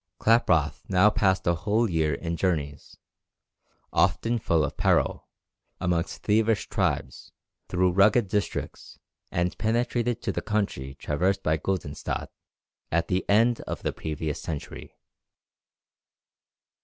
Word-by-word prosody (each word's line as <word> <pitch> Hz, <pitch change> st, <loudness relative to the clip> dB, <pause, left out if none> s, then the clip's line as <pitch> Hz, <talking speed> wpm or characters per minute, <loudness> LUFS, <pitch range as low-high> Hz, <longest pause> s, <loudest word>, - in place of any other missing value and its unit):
Klaproth 80 Hz, -10 st, +3 dB
now 100 Hz, +3 st, +5 dB
passed 95 Hz, -2 st, +1 dB
a 85 Hz, -, +3 dB
whole 105 Hz, +7 st, +1 dB
year 80 Hz, -5 st, +1 dB
in 85 Hz, +3 st, -4 dB
journeys, 75 Hz, -5 st, -2 dB, 1.0 s
often 115 Hz, +1 st, +2 dB
full 85 Hz, -7 st, +1 dB
of -, -, -6 dB
peril, -, -, +1 dB, 0.5 s
amongst 90 Hz, -1 st, -1 dB
thievish 110 Hz, 0 st, +2 dB
tribes, 90 Hz, -9 st, -2 dB, 0.4 s
through 90 Hz, 0 st, +2 dB
rugged 100 Hz, +4 st, +4 dB
districts, 105 Hz, +1 st, -3 dB, 0.3 s
and 90 Hz, +1 st, 0 dB
penetrated 120 Hz, +1 st, 0 dB
to -, -, 0 dB
the -, -, -3 dB
country 95 Hz, -11 st, -2 dB
traversed 90 Hz, +9 st, -1 dB
by 80 Hz, -, +2 dB
Guldenstædt 80 Hz, -2 st, -3 dB, 0.6 s
at 85 Hz, +1 st, 0 dB
the 95 Hz, 0 st, +1 dB
end 115 Hz, +3 st, +4 dB
of -, -, -5 dB
the -, -, -1 dB
previous 75 Hz, -1 st, -4 dB
century. 75 Hz, -3 st, -7 dB
95 Hz, 120 wpm, -26 LUFS, 80-105 Hz, 1.0 s, now